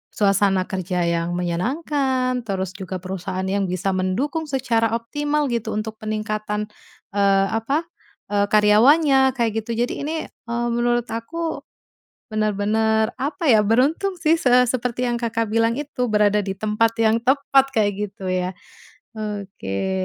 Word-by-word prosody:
suasana 195 -2 +3
kerja 185 -1 -2
yang 170 0 -1
menyenangkan, 255 - -1
terus 190 -2 -2
juga 190 -1 -7
perusahaan 185 0 -4
yang 195 +1 0
bisa 185 +2 -1
mendukung 235 - -1
secara 230 -5 +1
optimal 290 +4 -1
gitu, 235 -3 -2
untuk 215 +1 -4
peningkatan, 215 -1 -3 0.4
eee, 195 -1 +3
apa, 225 +8 0 0.5
eee, 205 0 +2
karyawannya 265 +6 +5
kayak 235 -3 +1
gitu. 230 +1 -4
Jadi 245 - -2
ini, 300 +3 -3 0.2
eee, 235 0 -4
menurut 240 0 0
aku 320 +9 -4 0.7
bener-bener 215 +1 +1
apa 295 +6 -3
ya, 220 - +6
beruntung 270 - +2
sih 320 -1 +3
se 250 -2 +5
seperti 250 0 -1
yang 240 -1 -1
Kakak 230 -1 0
bilang 230 +1 +2
itu, 280 -4 -2
berada 210 -1 +3
di 195 -1 -4
tempat 215 +2 +1
yang 225 0 +3
tepat 270 +1 +3
kayak 210 -2 +3 0.2
gitu 195 0 -14
ya, 185 0 -1 0.6
oke. 195 - -4
220 Hz, 140 wpm, -22 LUFS, 200-250 Hz, 0.7 s, ya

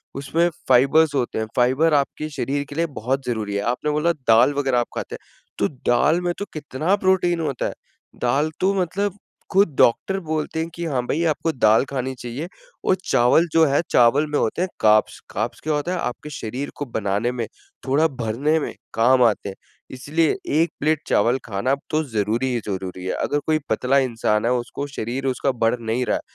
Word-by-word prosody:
उसमें 165 +5 +1 0.2
फ़ाइबर्स 140 +5 +5
होते 125 -4 -1
हैं, 110 - -1
फ़ाइबर 130 +6 +3
आपके 145 +2 -1
शरीर 145 -1 -2
के 145 - -8
लिए 165 +2 +1
बहुत 130 +4 -1
ज़रूरी 110 -4 -2
है। 100 - 0
आपने 150 +4 -2
बोला 150 +3 +2 0.2
दाल 120 +5 +6
वग़ैरह 135 -3 +1
आप 120 - -1
खाते - - -4
हैं - - -16 0.3
तो 100 - +3 0.2
दाल 145 +8 +3
में 175 0 -1
तो 205 - -3
कितना 155 +4 -1
प्रोटीन 185 -3 +2
होता 140 -6 -2
है। - - -5 0.5
दाल 140 +6 +1
तो 195 +1 +3
मतलब 195 +3 -2 0.3
खुद 190 -6 +3
डॉक्टर 190 +11 +3
बोलते 160 -2 -3
हैं 165 +1 -2
कि, 170 0 -4
हाँ 135 -6 0
भाई 165 +3 0
आपको 165 +1 0
दाल 110 -5 +4
खानी 130 -1 -3
चाहिए। 125 +8 -5 0.4
वो - - +4
चावल 125 +8 +4
जो 165 -1 +6
है 140 +1 +2
चावल 125 +5 +4
में 150 - +1
होते 140 +10 -1
हैं 185 - 0
कार्ब्स। 110 0 +3
कार्ब्स 110 +4 -3
क्या 155 0 0
होता 150 +4 -1
है 185 - -1
आपके 125 +3 -4
शरीर 130 +2 -5
को 145 - -4
बनाने 110 0 -1
में 125 - -3 0.4
थोड़ा 150 +5 +3
भरने 135 +4 0
में - - -4 0.2
काम 125 +3 +4
आते 105 -3 +1
हैं। 95 - -8 0.4
इसलिए 150 +5 0 0.3
1 170 - +2
प्लेट 155 0 +2
चावल 120 +5 +3
खाना 115 +6 0 0.2
तो 155 +1 +1
ज़रूरी 110 +4 0
ही 120 - 0
ज़रूरी 95 -2 -5
है। 95 - -1
अगर 145 - 0
कोई 155 0 +2
पतला 125 +5 +2
इंसान 115 -4 0
है 120 - +2
उसको 125 +3 -3
शरीर 135 0 -4
उसका 130 +1 0
बढ़ 115 +2 +2
नहीं 115 +2 -1
रहा - - +1
है, - - -8
135 Hz, 200 wpm, -22 LUFS, 120-155 Hz, 0.5 s, दाल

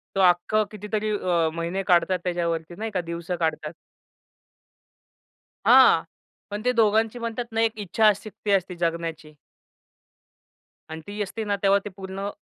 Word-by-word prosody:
तो 195 - +2
अख्खं 175 +5 +1
कितीतरी 215 +1 -3
अ, 170 -4 +1
महिने 170 +4 -3
काढतात 180 0 +3
त्याच्यावरती 170 -2 -2
नाही 220 +1 -4
का. 185 -3 -1
दिवसं 170 +1 -4
काढतात. 160 -1 -2 1.9
हां, - - +7 0.5
पण 205 +1 -4
ते 250 - +4
दोघांची 220 +2 +2
म्हणतात 235 +1 -3
ना, 225 0 0
एक 225 -1 +3
इच्छाशक्ती 210 +1 +1
असते 190 -2 +1
जगण्याची. 165 -2 -4 1.5
आणि 160 0 -7
ती 205 +1 -5
असते 220 +3 -5
ना, 205 -1 0
तेव्हा 200 0 +4
ते - - -4
पूर्ण 195 +1 -6
195 Hz, 135 wpm, -24 LUFS, 170-215 Hz, 1.9 s, हां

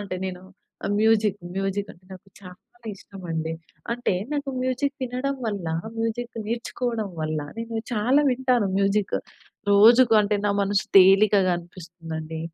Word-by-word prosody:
అంటే 200 -2 -5
నేను 180 -1 -5 0.6
music, 215 -2 +3 0.2
music 195 +1 -2
అంటే 180 +1 -23
నాకు 190 +1 -13
చాలా 180 -1 -11 0.4
ఇష్టం 195 0 -13
అండి. 160 0 -2 0.4
అంటే 245 -4 -1 0.2
నాకు 285 -1 -2
మ్యూజిక్ 260 +2 -1
వినడం 255 +3 -2
వల్ల 200 -5 -3 0.3
మ్యూజిక్ 230 +1 -2
నేర్చుకోవడం 230 -1 -3
వల్ల 155 0 -2 0.2
నేను 230 0 -3
చాలా 245 +7 +3
వింటాను 250 -5 +1
మ్యూజిక్. 200 +1 +1 0.5
రోజుకు 225 +4 +7
అంటే 210 0 0
నా - - +2
మనసు 200 0 +1
తేలికగా 195 0 +5
అనిపిస్తుందండి 165 -2 -8
205 Hz, 130 wpm, -24 LUFS, 185-235 Hz, 0.6 s, రోజుకు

